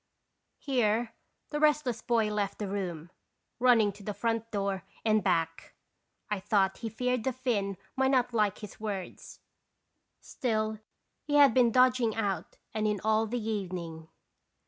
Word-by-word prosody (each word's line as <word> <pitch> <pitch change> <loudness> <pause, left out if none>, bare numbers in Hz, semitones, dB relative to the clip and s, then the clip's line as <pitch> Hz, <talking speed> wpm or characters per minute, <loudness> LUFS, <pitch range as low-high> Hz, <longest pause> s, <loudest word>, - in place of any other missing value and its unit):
Here 235 -4 0 0.4
the 295 - -2
restless 295 -6 +2
boy 225 -3 +1
left 205 -2 -1
the 210 - -3
room, 180 -4 -4 0.5
run 245 -1 +6
ning 210 -2 +3
to 205 +1 -15
the 210 0 -4
front 230 +1 -1
door 200 -3 -2 0.2
and 215 -2 +3
back. 165 -1 -1 0.5
I 210 -2 -2
thought 195 -1 +1
he 230 - -4
feared 250 +1 -1
the 265 - +1
Finn 225 -7 -1 0.2
might 265 0 +2
not 250 -2 +2
like 210 -3 +2
his 210 -3 -10
words; 200 -4 -6 0.8
still 215 -3 -2 0.4
he 290 0 -2
had 285 -4 +7
been 245 -1 +5
dodging 250 -2 +4
out 195 -6 -2 0.2
and 215 -1 0
in 210 -1 0
all 220 +1 +2
the 225 -1 -3
evening. 175 -6 -4
215 Hz, 150 wpm, -30 LUFS, 200-245 Hz, 0.8 s, had